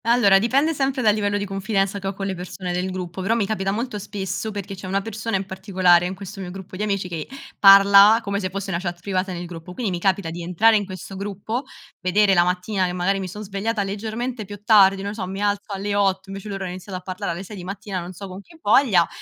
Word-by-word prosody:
Allora 220 -5 +5
dipende 275 +9 +2
sempre 270 -2 -1
dal 210 -2 +5
livello 205 -1 0
di 205 - -2
confidenza 195 0 -1
che 195 - -5
ho 195 - -2
con 195 - -4
le 195 - -2
persone 180 0 -5
del 180 +1 -1
gruppo, 185 -1 -5
però 210 +5 +1
mi 225 -3 +1
capita 195 -2 -2
molto 230 +1 -3
spesso 200 +1 -4
perché 200 -2 -5
c'è 190 -1 -8
una 195 +1 0
persona 220 0 -3
in 195 - -4
particolare 185 -2 +3
in 185 - -5
questo 195 +1 -8
mio 180 - -6
gruppo 190 0 -9
di 190 - -5
amici 200 -3 -1
che 165 -3 -5 0.3
parla 200 +2 +8
come 200 -1 -2
se 185 -2 -2
fosse 195 +1 -4
una 170 - -1
chat 175 -1 -4
privata 190 0 -2
nel 175 -1 -5
gruppo. 170 +1 -9
Quindi 220 -1 -2
mi 175 - -2
capita 190 -2 0
di 170 +1 -6
entrare 180 +6 +4
in 205 -1 +1
questo 185 0 -8
gruppo, 205 +6 -4 0.3
vedere 195 +2 +3
la 175 -2 +5
mattina, 180 +2 0
che 180 - -3
magari 185 +2 0
mi 190 - -4
son 210 +4 -7
svegliata 205 +2 -2
leggermente 220 +4 -4
più 205 +1 -10
tardi, 195 -3 +5
non 200 +1 -3
so, 205 -4 -4
mi 195 +1 -5
alzo 205 0 -1
alle 200 +1 -2
8, 195 -1 +1
invece 195 +2 -7
loro 195 -1 -4
hanno 180 - -4
iniziato 185 +1 -7
a - - -8
parlare 185 -2 -3
alle 175 +3 -6
6 205 +2 -9
di 180 - -7
mattina, 195 0 -5
non 175 +1 -7
so 195 +3 -8
con 185 +1 -9
che 330 +10 -19
voglia, 205 - +4
195 Hz, 255 wpm, -22 LUFS, 185-205 Hz, 0.3 s, parla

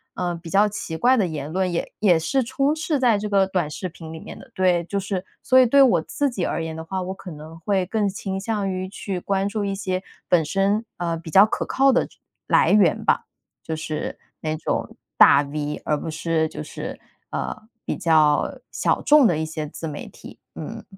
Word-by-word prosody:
呃， 175 -1 -2
比 170 0 -9
较 200 +4 +4
奇 185 -5 -5
怪 250 +8 +4
的 215 -6 +2
言 150 -3 -5
论， 185 +1 0
也 170 - -3
也 180 -5 +4
是 260 +11 +1
充 275 +5 0
斥 315 -2 -1
在 240 -5 +4
这 210 +1 -4
个 195 -1 +3
短 180 -5 -1
视 185 +5 -5
频 165 -1 -10
里 160 - -7
面 - - -10
的。 - - -15
对， 180 -2 +2
就 200 +4 -2
是， 195 -1 -3 0.2
所 260 - +3
以 260 - +8
对 275 +4 +5
我 210 -11 +5
自 285 - -1
己 205 -8 -3
而 - - -2
言 160 0 -4
的 160 - -6
话， 190 +3 -3
我 185 +1 -4
可 190 -2 -10
能 155 +2 -10
会 190 +2 0
更 205 +1 0
倾 195 0 -4
向 205 -1 -2
于 185 0 -3
去 195 -1 -5
关 195 +1 0
注 205 0 -2
一 200 -1 -1
些 190 -1 -3 0.2
本 175 -3 +4
身， 195 +7 +1
啊， 170 -1 -1
比 165 0 -8
较 195 +4 +8
可 220 - -2
靠 270 +1 +3
的 - - +2 0.4
来 - - +4
源 200 -6 +4
吧。 - - +2 0.4
就 160 - -3
是 155 -1 -4 0.2
那 155 0 -2
种 - - -3 0.2
大 140 - +8
V， 150 +1 -4
而 150 - +1
不 - - -5
是 160 0 0
就 - - -7
是， - - -7 0.3
呃， - - -4 0.2
比 - - -2
较 155 -3 +3
小 - - 0
众 295 -2 +6
的 170 -6 +1
一 160 - -1
些 155 -1 -4
自 160 +2 -7
媒 145 - -6
体， - - -13 0.2
嗯。 - - -7
185 Hz, 235 characters per minute, -23 LUFS, 160-205 Hz, 0.4 s, 以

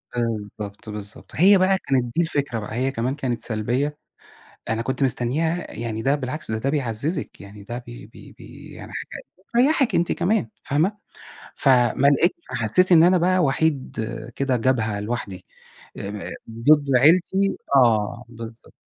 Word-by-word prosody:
بالضبط، 105 -2 -4
بالضبط، 105 -1 -8
هي 195 +4 +6
بقى 190 +1 +3
كانت 135 -7 0
دي 170 - +3
الفكرة 145 -7 -1
بقى، 105 +1 -6
هي 130 +3 0
كمان 130 +2 -2
كانت 125 -5 -3
سلبية، 125 +7 -1 0.7
أنا 110 +1 0
كنت 130 +2 -2
مستنِّيها 150 +8 -1
يعني 110 -1 -4
ده 135 +4 +2
بالعكس، 145 -2 -5
ده 110 - -1
ده 135 +5 -1
بيعزّزِك، 140 - -3
يعني 100 0 -12
ده 120 +3 -6
بي - - -10
بي - - -15
بي - - -13
يعني - - -10
حاجة - - -7 0.3
بتريّحِك 265 +2 +2
أنتِ 170 - +1
كمان 175 - 0
فاهمة، 165 +9 0 0.6
فما 130 +1 +3
لقيتش 145 - +3 0.2
فحسّيت 185 0 +2
إن 165 -1 +8
أنا 180 +1 +5
بقى 185 +2 +2
وحيد 145 -5 0 0.4
كده 135 -2 +1
جبهة 110 -4 0
لوحدي، 105 -4 -5 0.5
آآ 100 - -5 0.4
م 115 0 -10
ضد 145 +1 +5
عيلتي 185 +7 +3 0.2
آه، 115 -1 +3
بالضبط. 115 -1 -11
130 Hz, 155 wpm, -23 LUFS, 115-160 Hz, 0.7 s, إن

